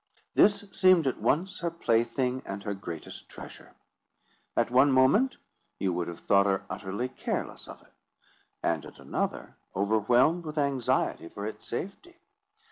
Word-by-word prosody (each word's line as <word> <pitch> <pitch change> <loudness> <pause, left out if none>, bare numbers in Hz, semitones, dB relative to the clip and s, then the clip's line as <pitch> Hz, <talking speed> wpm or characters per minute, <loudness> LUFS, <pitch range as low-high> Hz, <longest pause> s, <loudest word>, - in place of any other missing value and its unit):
This 205 0 +4
seemed 185 -4 +5
at 130 - -1
once 180 +6 0
her 170 - -1
plaything 125 -4 0
and 100 +1 -6
her 100 - -2
greatest 85 -5 -8
treasure. - - -11 0.8
At - - +2
one 130 +3 +5
moment, 135 - +4 0.4
you 95 -2 0
would 85 0 -2
have 85 - -7
thought 100 0 +4
her 95 0 0
utterly 100 +6 -3
careless - - -4
of - - -11
it, - - -26 0.7
and 80 -4 0
at - - -12
another, - - -4 0.2
overwhelmed 115 - +3
with 155 -1 -7
anxiety 135 - 0
for 100 - -6
its 110 - -7
safety. 200 - -6
125 Hz, 145 wpm, -28 LUFS, 100-160 Hz, 0.8 s, seemed